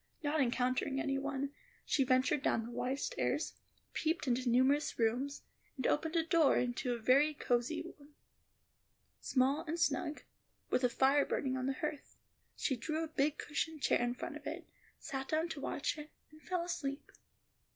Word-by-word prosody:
Not 295 +1 +2
encountering 255 +2 +1
any 275 -2 0
one, 275 0 -2 0.3
she 275 - +3
ventured 255 +2 +3
down 225 - +1
the 235 - -7
wide 260 +3 -1
stairs, - - -1 0.4
peeped 320 -2 0
into 250 0 +1
numerous 265 +5 +3
rooms, 245 +5 0 0.3
and 260 - -3
opening 320 +2 +1
a 325 - +2
door 330 -4 +5
into 245 0 0
a - - -6
very 275 +7 +4
cosy 245 +3 0 0.2
one, 290 +1 -18 1.0
small 270 +3 +2
and 330 +3 -2
snug, 295 -2 0 0.5
with 250 - +2
a 250 - +5
fire 270 +4 +4
burning 260 -1 -1
on 260 0 -1
the 270 - +1
hearth, 295 +1 -5 0.4
she 265 - 0
drew 310 +7 -2
a - - -3
big 300 -1 +1
cushioned 300 +1 -3
chair - - +3
in 245 0 0
front - - -5
of - - -8
it, - - -5 0.3
sat 270 -1 -5
down 320 +2 0
to 315 -4 -5
watch 285 - -1
it, 300 0 -8 0.2
and 310 0 -16
fell 360 0 -1
asleep. 315 -5 -4
275 Hz, 170 wpm, -35 LUFS, 255-305 Hz, 1.0 s, door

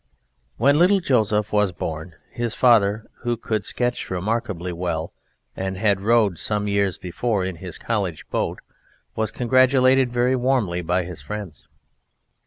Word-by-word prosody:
When 140 +6 +4
little 190 +3 +5
Joseph 110 - +1
was 105 -2 +3
born, 80 -1 -6 0.2
his 120 -1 -3
father 110 -3 +3
(who 120 -1 -2
could 110 -2 -2
sketch 120 +3 -2
remarkably 95 -2 -2
well 85 -2 -3 0.4
and 95 0 -3
had 100 -1 +2
rowed 105 -4 +2
some 105 -1 -1
years 100 -2 +1
before 95 +2 -2
in 95 -2 -4
his 90 -1 -7
College 95 -10 -3
boat) - - -2 0.5
was 110 -1 0
congratulated 130 +1 +3
very 125 +2 +2
warmly 120 -9 0
by 90 +2 0
his 85 -1 -8
friends. 100 -11 -7
105 Hz, 140 wpm, -22 LUFS, 90-120 Hz, 0.5 s, little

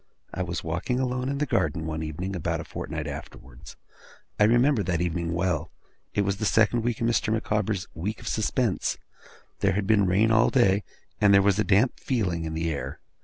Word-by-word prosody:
I - - -3
was 85 -1 -3
walking 90 +10 -2
alone 125 0 -1
in 140 - -2
the 150 - 0
garden, 80 - 0
one 80 0 -3
evening, 85 +5 -4
about 90 - -2
a - - -4
fortnight - - -5
afterwards. 60 -2 -9 0.6
I 105 - +6
remember 120 +2 +4
that 85 -3 -1
evening 85 -1 -1
well. 85 -3 -1 0.5
It 100 - +3
was 100 -1 0
the 110 - -2
second 110 +3 +3
in 120 +1 -1
Mr. 115 -2 +1
Micawber's 105 -3 -1
week 105 +6 -4
of - - -10
suspense. 110 -1 0 0.6
There - - +2
had 100 0 -1
been 100 -2 +3
rain 105 +5 +3
all 110 0 +4
day, 105 -6 +3 0.4
and 105 -1 +5
there 100 - +6
was 100 0 +3
a - - +4
damp 105 +5 +2
feeling 90 -10 -1
in 80 0 -4
the 80 +1 -1
air. 65 -3 -5
100 Hz, 195 wpm, -26 LUFS, 85-110 Hz, 0.6 s, I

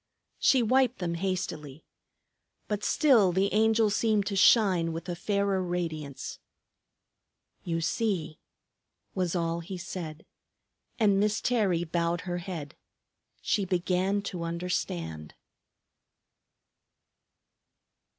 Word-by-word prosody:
She 260 -3 +4
wiped 255 +2 +3
them 175 -2 -2
hastily. 165 -5 -4 0.8
But 210 0 -2
still 240 - +4
the 190 +3 +1
Angel 220 0 +3
seemed 210 -1 +1
to 200 -1 -2
shine 190 -5 +4
with 165 +2 -6
a 175 - -3
fairer 200 +1 0
radiance. 165 -6 -4 1.2
"You 165 -1 -2
see!" 170 -4 -1 0.7
was 185 -2 -1
all 170 -1 -1
he 175 +3 -7
said. 170 -3 -7 0.7
And 205 -4 +3
Miss 210 0 +1
Terry 200 -9 +1
bowed 170 0 -1
her 175 -1 -3
head. 170 -5 -6 0.7
She 205 - +1
began 185 +2 0
to 180 -3 -5
understand. 90 - -3
180 Hz, 100 wpm, -28 LUFS, 170-205 Hz, 1.2 s, She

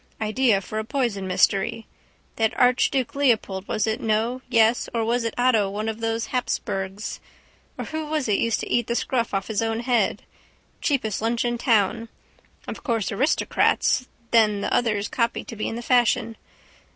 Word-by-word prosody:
Idea 220 -1 +2
for 215 +3 -5
a - - -2
poison 230 -6 -2
mystery. 195 +4 +1 0.5
That 220 -1 0
archduke 250 +2 +2
Leopold 225 -9 +1
was 215 - 0
it 220 +1 -2
no 225 +3 0
yes 230 -1 +3
or 225 -1 +1
was 235 +1 +1
it 230 - -3
Otto 235 -5 +3
one 210 +2 -4
of 220 0 -3
those 225 0 -2
Habsburgs? 195 -5 -3 0.6
Or - - -4
who 315 -1 -4
was 300 -4 -1
it 205 -2 +2
used 230 -1 0
to - - -5
eat 240 -1 +1
the 235 - -1
scruff 240 -1 -1
off 195 -1 -1
his 220 -1 -1
own 225 0 -1
head? 240 -1 +1 0.6
Cheapest 235 -9 0
lunch 230 +2 0
in 240 0 -1
town. 225 -2 +1 0.6
Of - - -6
course 230 -7 -1
aristocrats, 255 +1 +1 0.2
then 215 -3 +4
the - - -2
others 215 -3 +1
copy 235 -1 -1
to 230 - -9
be 215 - -3
in - - -4
the 240 - -6
fashion. 235 -2 +2
230 Hz, 175 wpm, -24 LUFS, 215-245 Hz, 0.6 s, then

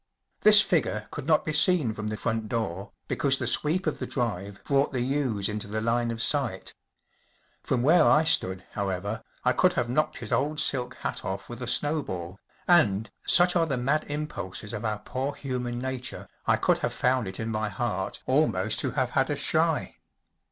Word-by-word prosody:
This 210 0 +8
figure 115 - 0
could 135 - -6
not 155 -2 +3
be 155 - -2
seen 150 -6 +3
from 105 0 -5
the 110 0 -3
front 110 -1 -2
door 100 -3 -3 0.2
because 135 -2 +1
the - - -3
sweep 170 +5 +1
of 155 - -1
the - - -4
drive 100 -6 -3
brought 140 0 +1
the 130 - -2
yews 125 -6 0
into 105 0 -4
the 110 +2 -3
line 115 +1 0
of 115 0 -1
sight. 130 -11 +1 0.9
From 125 -2 -1
where 160 +4 +6
I 150 +1 +5
stood, 95 -12 +1
however, 100 +2 -3 0.2
I 125 - +3
could 180 +8 +3
have 120 -8 -1
knocked 155 +4 0
his 115 - -7
old 150 +2 0
silk 130 -4 0
hat - - -4
off 95 +1 -4
with 120 +1 -8
a 125 - -4
snowball, 100 - -1 0.3
and, 110 - +3 0.2
such 175 0 +5
are 165 -2 +3
the 135 -4 -1
mad 140 +5 0
impulses 145 -9 -5
of 105 - -5
our 110 -1 -1
poor 135 +6 -4
human 125 -3 -4
nature, 130 0 -5 0.2
I - - +5
could - - +1
have - - -2
found 125 -3 +1
it 95 - -6
in 110 - -3
my 110 -1 -1
heart 95 - -3
almost - - +2
to - - -1
have - - 0
had - - +1
a - - 0
shy. - - 0
125 Hz, 195 wpm, -27 LUFS, 105-145 Hz, 0.9 s, This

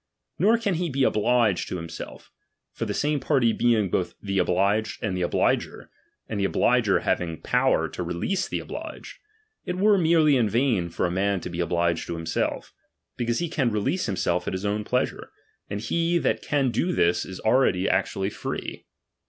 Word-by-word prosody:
Nor 215 +7 +4
can 210 -4 -1
he 175 0 -1
be 135 -1 0
obliged 110 -5 +2
to - - -3
" - - -2
himself; 85 -1 -9 0.4
for - - -3
the - - -2
same 150 0 0
party 130 -6 +2
being 110 -6 +2
both 90 - -1
the 100 -1 -2
obliged 100 +5 +1
and 100 -4 -1
the 90 - -2
obUger, 85 - 0 0.4
and 105 - -3
the - - 0
obliger 100 - +2
having 80 -3 -1
power - - +2
to - - -6
release 90 - -2
the - - -2
obliged, - - -8 0.4
it 180 - -4
were 205 +1 +4
merely 160 -4 +4
in 115 -4 +2
vain 115 -7 +1
for 85 - -1
a 90 - -1
man 100 +1 0
to - - -6
be 85 - -5
obliged 85 -1 0
to 85 - -3
himself; 80 -1 -2 0.4
because 120 -1 -1
he 170 - -1
can 145 -6 0
re 105 -2 -1
lease 180 - -1
himself 90 -2 -1
at - - -2
his 95 +2 -4
own 105 +1 -1
pleasure, 125 +4 -2 0.4
and 100 0 -4
he 170 +9 +1
that - - 0
can 140 -4 +1
do 180 +8 0
this 85 - +2
is 95 - -8
already 110 -6 +2
actually 95 +1 0
free. - - -5
105 Hz, 190 wpm, -25 LUFS, 90-145 Hz, 0.4 s, Nor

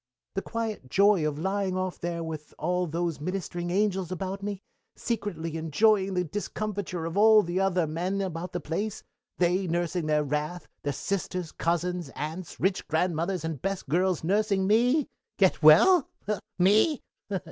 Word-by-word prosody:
"The - - -1
quiet 225 - -4
joy 200 -3 +4
of 145 -1 -3
lying 190 +2 -1
off 185 -1 -3
there 170 -1 -3
with 155 -2 -7
all 180 +3 0
those 165 -1 -2
ministering 175 0 -3
angels 190 -1 0
about 190 +2 -4
me, 200 -1 -4 0.3
secretly 180 -8 -3
enjoying 190 +5 +2
the 180 - +2
discomfiture 200 -1 -4
of 165 +1 -4
all 215 0 +7
the 175 +2 -2
other 185 -3 +2
men 175 +5 -2
about 180 -2 -3
the 175 - -3
place 185 +7 -3 0.3
they 180 +2 +2
nursing 175 0 -1
their 150 -1 +2
wrath; 150 +4 -3
their 145 - -1
sisters, 180 +2 -3
cousins, 175 -1 -1
aunts, 160 +4 -6
rich 190 +1 0
grandmothers, 170 +1 0
and 160 -5 -4
best 195 -1 -3
girls 180 +2 +1
nursing 200 +2 +1
me 245 +8 +3 0.3
get 190 -4 +3
well? 255 - +7 0.5
me? 210 - +4
180 Hz, 150 wpm, -27 LUFS, 165-200 Hz, 0.5 s, all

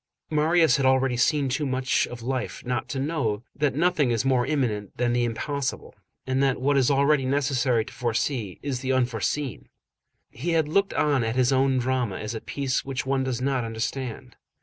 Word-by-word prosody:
Marius 155 -1 +4
had 135 - 0
already 130 -1 +3
seen 140 +3 +2
too 135 +4 -1
much 130 0 +1
of 120 -1 -9
life 130 0 -3
not 125 0 -2
to 135 - -3
know 130 -8 -1
that 145 -2 0
nothing 160 -4 +2
is 120 +1 0
more 130 -2 +2
imminent 110 -9 -1
than 120 0 +1
the 120 0 +2
impossible, 130 +4 -3 0.3
and 130 +1 0
that 135 -2 +2
what 140 +2 +2
it - - +5
is 130 - +3
always 140 0 +3
necessary 130 -4 +1
to - - -11
foresee 120 -3 -2
is 135 -3 -2
the 130 +1 -2
unforeseen. 125 +1 -1 0.6
He 165 +8 -3
had 160 -2 +2
looked 195 +6 +1
on 145 -5 +2
at 115 +1 -1
his 130 0 +3
own 135 0 +3
drama 125 -5 0
as 105 +2 -5
a 110 - -5
piece 135 -2 -2
which 135 -1 -4
one 135 0 +1
does 130 -2 -2
not 135 -2 0
understand. 115 +2 -4
130 Hz, 195 wpm, -25 LUFS, 120-140 Hz, 0.6 s, it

